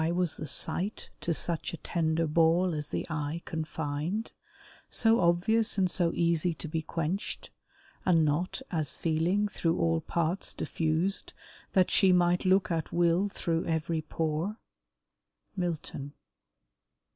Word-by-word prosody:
Why 160 Hz, -, +1 dB
was 175 Hz, -2 st, 0 dB
the 155 Hz, -, -5 dB
sight 185 Hz, +9 st, 0 dB
To 170 Hz, -, -1 dB
such 170 Hz, 0 st, -1 dB
a -, -, -12 dB
tender 165 Hz, -1 st, 0 dB
ball 165 Hz, +3 st, +3 dB
as 150 Hz, -1 st, -4 dB
th' -, -, -2 dB
eye 155 Hz, +2 st, -3 dB
confined, 160 Hz, +5 st, -3 dB, 0.6 s
So 225 Hz, 0 st, +3 dB
obvious 190 Hz, +6 st, +2 dB
and 185 Hz, -2 st, +2 dB
so 170 Hz, -2 st, +2 dB
easy 170 Hz, 0 st, +2 dB
to 160 Hz, -, -7 dB
be 160 Hz, +1 st, -2 dB
quenched, 165 Hz, +4 st, -3 dB, 0.5 s
And 165 Hz, -4 st, +4 dB
not, 170 Hz, -, -1 dB
as 155 Hz, -5 st, -1 dB
feeling, 170 Hz, +6 st, +1 dB
through 165 Hz, -5 st, -1 dB
all 80 Hz, -1 st, +1 dB
parts 170 Hz, +3 st, -2 dB
diffused; 165 Hz, +5 st, 0 dB, 0.4 s
That 185 Hz, -2 st, +3 dB
she 195 Hz, -2 st, +5 dB
might 180 Hz, +1 st, +3 dB
look 190 Hz, 0 st, +3 dB
at 165 Hz, -2 st, -2 dB
will 175 Hz, +3 st, +2 dB
through 165 Hz, -3 st, -2 dB
every 160 Hz, 0 st, -1 dB
pore? 160 Hz, +6 st, -2 dB, 1.0 s
MILTON. 160 Hz, -6 st, -3 dB
170 Hz, 135 wpm, -29 LUFS, 160-180 Hz, 1.0 s, she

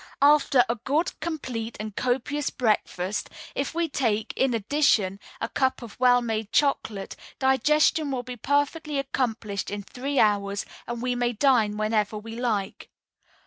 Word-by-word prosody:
"After 285 Hz, -3 st, +5 dB
a 235 Hz, -, -1 dB
good, 295 Hz, +10 st, 0 dB
complete, 255 Hz, -8 st, -4 dB
and 215 Hz, -1 st, -6 dB
copious 265 Hz, +3 st, -1 dB
breakfast, 210 Hz, -4 st, -1 dB, 0.2 s
if 275 Hz, +3 st, -3 dB
we 340 Hz, 0 st, +1 dB
take, 225 Hz, -7 st, -1 dB
in 265 Hz, -3 st, +2 dB
addition, 215 Hz, -5 st, +2 dB, 0.2 s
a -, -, -1 dB
cup 260 Hz, -2 st, 0 dB
of 230 Hz, -1 st, -11 dB
well 245 Hz, -1 st, +5 dB
made 220 Hz, -2 st, -2 dB
chocolate, 220 Hz, -8 st, 0 dB, 0.2 s
digestion 295 Hz, +3 st, +3 dB
will 255 Hz, -2 st, -2 dB
be 250 Hz, 0 st, -7 dB
perfectly 290 Hz, +4 st, 0 dB
accomplished 225 Hz, -7 st, -2 dB
in 205 Hz, 0 st, -4 dB
three 270 Hz, +7 st, -4 dB
hours, 200 Hz, -1 st, +2 dB, 0.2 s
and 240 Hz, 0 st, -4 dB
we 250 Hz, 0 st, +1 dB
may 245 Hz, 0 st, 0 dB
dine 220 Hz, -4 st, +3 dB
whenever 215 Hz, -1 st, 0 dB
we 225 Hz, +2 st, -8 dB
like. 220 Hz, -5 st, -2 dB
245 Hz, 145 wpm, -26 LUFS, 215-275 Hz, 0.2 s, After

